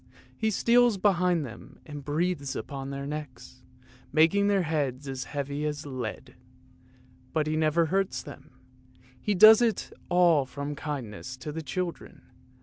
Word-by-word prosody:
He 220 Hz, +11 st, 0 dB
steals 235 Hz, +1 st, +4 dB
behind 180 Hz, -5 st, +2 dB
them 120 Hz, -3 st, -11 dB
and 145 Hz, -2 st, -8 dB
breathes 150 Hz, -1 st, -1 dB
upon 135 Hz, -2 st, -5 dB
their 140 Hz, 0 st, -5 dB
necks, 140 Hz, -4 st, -8 dB, 0.5 s
making 165 Hz, +7 st, +4 dB
their 200 Hz, -2 st, +2 dB
heads 145 Hz, -4 st, -2 dB
as 130 Hz, -2 st, -4 dB
heavy 145 Hz, 0 st, -4 dB
as 150 Hz, 0 st, -3 dB
lead; 130 Hz, -5 st, -6 dB, 1.0 s
but 155 Hz, -2 st, +1 dB
he 155 Hz, 0 st, -1 dB
never 155 Hz, +1 st, +2 dB
hurts 195 Hz, +4 st, -1 dB
them; 145 Hz, -, -12 dB, 0.7 s
he 210 Hz, -, 0 dB
does 215 Hz, +4 st, +9 dB
it 230 Hz, -3 st, 0 dB, 0.2 s
all 175 Hz, -5 st, +4 dB
from 140 Hz, +2 st, -5 dB
kindness 130 Hz, -4 st, -6 dB
to 150 Hz, +3 st, -6 dB
the 160 Hz, +2 st, -5 dB
children. 170 Hz, +4 st, -5 dB
150 Hz, 145 wpm, -28 LUFS, 140-180 Hz, 1.0 s, does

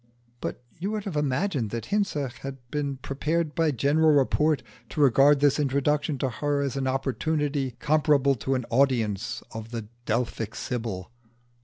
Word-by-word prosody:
But -, -, -5 dB, 0.2 s
you 190 Hz, +4 st, -2 dB
would 215 Hz, -1 st, -2 dB
have 195 Hz, -6 st, -5 dB
imagined 145 Hz, -, 0 dB
that 115 Hz, +1 st, -4 dB
Hinze 150 Hz, -11 st, 0 dB
had 135 Hz, 0 st, -6 dB
been 140 Hz, -2 st, -2 dB
prepared 150 Hz, +4 st, -1 dB
by 165 Hz, -1 st, +2 dB
general 145 Hz, +4 st, +3 dB
report 150 Hz, +1 st, +3 dB, 0.3 s
to -, -, -5 dB
regard 140 Hz, +1 st, +5 dB
this 145 Hz, 0 st, +4 dB
introduction 145 Hz, +1 st, +1 dB
to 130 Hz, 0 st, 0 dB
her 145 Hz, +3 st, -1 dB
as 140 Hz, -1 st, -2 dB
an 135 Hz, -1 st, -1 dB
opportunity 135 Hz, 0 st, -1 dB
comparable 145 Hz, -1 st, +3 dB
to 130 Hz, +2 st, -1 dB
an 125 Hz, -2 st, -2 dB
audience 120 Hz, -5 st, +1 dB
of 110 Hz, 0 st, -7 dB
the 115 Hz, -3 st, -6 dB, 0.2 s
Delphic 115 Hz, -1 st, -1 dB
Sibyl. 110 Hz, -5 st, -4 dB
140 Hz, 155 wpm, -26 LUFS, 125-150 Hz, 0.3 s, regard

